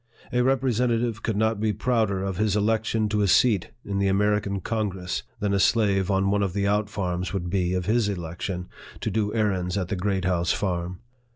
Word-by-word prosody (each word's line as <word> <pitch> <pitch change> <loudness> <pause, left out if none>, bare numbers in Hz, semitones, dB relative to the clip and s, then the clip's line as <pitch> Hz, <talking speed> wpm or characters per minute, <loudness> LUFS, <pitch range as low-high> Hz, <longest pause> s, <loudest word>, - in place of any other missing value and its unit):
A 125 - +3
representative 120 -3 +1
could 110 -3 -1
not 110 0 +1
be 110 0 +1
prouder 110 -3 0
of 95 -2 -3
his 105 -1 +1
election 110 +1 +1
to 105 0 +1
a 100 - +3
seat 100 -1 +3 0.2
in 100 -1 -2
the 100 - +2
American 100 0 +1
Congress, 95 -4 -2 0.2
than 100 -2 0
a 100 - +2
slave 100 -3 +2
on 95 0 +2
one 100 0 +2
of 95 -3 0
the 100 0 0
out 105 +1 +1
farms 90 -3 -3
would 90 -3 -3
be 90 -2 +1
of 90 -1 -1
his 110 -1 +2
election 90 0 -4 0.3
to - - -1
do 105 -2 0
errands 95 -4 0
at 90 -3 -2
the - - -1
Great 95 0 -1
House 85 -2 +1
Farm. 90 -1 -2
100 Hz, 200 wpm, -25 LUFS, 95-110 Hz, 0.3 s, A